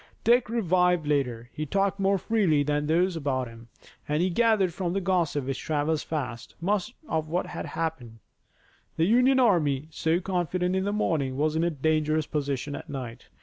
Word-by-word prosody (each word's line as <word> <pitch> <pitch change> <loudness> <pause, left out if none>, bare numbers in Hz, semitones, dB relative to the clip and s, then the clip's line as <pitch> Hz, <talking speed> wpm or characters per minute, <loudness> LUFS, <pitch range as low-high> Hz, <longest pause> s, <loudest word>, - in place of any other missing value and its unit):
Dick 240 -1 +4
revived 180 -6 +2
later. 125 -5 -1
He 155 0 -4
talked 195 +3 0
more 195 0 +3
freely 185 -8 +2
with 145 0 0
those 175 +3 +2
about 135 -5 -1
him, 115 0 -13 0.4
and 150 +3 +1
he 185 - +1
gathered 215 -3 +2
from 175 0 -2
the 195 - +1
gossip 175 -7 0
which 135 0 -3
travels 155 0 0
fast, 125 -7 -5
much 200 +6 -1
of 160 -1 -1
what 175 +3 0
had - - -6
happened. 140 -9 -4 0.8
The 160 - +3
Union 250 +6 +4
army, 155 - +2
so 160 +2 +1
confident 180 0 -1
in 190 0 0
the 205 - 0
morning, 150 -10 0
was 155 +2 +1
in 160 - +1
a 170 - +2
dangerous 155 0 0
position 145 -2 -3
at - - -8
night. 125 -5 -7
160 Hz, 180 wpm, -27 LUFS, 145-185 Hz, 0.8 s, Dick